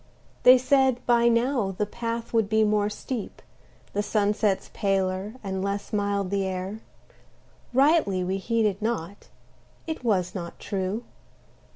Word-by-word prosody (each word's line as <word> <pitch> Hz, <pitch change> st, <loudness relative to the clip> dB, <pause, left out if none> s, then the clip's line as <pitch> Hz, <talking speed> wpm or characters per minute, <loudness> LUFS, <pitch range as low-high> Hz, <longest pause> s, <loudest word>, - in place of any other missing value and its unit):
They 255 Hz, +1 st, +8 dB
said 260 Hz, -1 st, +3 dB
by 235 Hz, -1 st, +4 dB
now 235 Hz, -4 st, +1 dB
the 210 Hz, -, +1 dB
path 230 Hz, +2 st, -5 dB
would 220 Hz, -3 st, +2 dB
be 220 Hz, 0 st, +3 dB
more 210 Hz, -1 st, +2 dB
steep, 220 Hz, +1 st, -6 dB, 0.5 s
the 205 Hz, -, +1 dB
sunsets 210 Hz, -1 st, 0 dB
paler 195 Hz, +1 st, -1 dB
and 190 Hz, -1 st, -3 dB
less 200 Hz, +1 st, -3 dB
mild 200 Hz, -2 st, 0 dB
the 200 Hz, -1 st, +1 dB
air; 190 Hz, +2 st, -4 dB, 0.9 s
Rightly 265 Hz, -, +3 dB
we 190 Hz, +2 st, -1 dB
heeded 215 Hz, -1 st, 0 dB
not; 200 Hz, -4 st, -3 dB, 0.6 s
it 320 Hz, -5 st, -5 dB
was 185 Hz, -6 st, +1 dB
not 170 Hz, -3 st, -6 dB
true. 195 Hz, +3 st, -3 dB
210 Hz, 135 wpm, -26 LUFS, 195-235 Hz, 0.9 s, They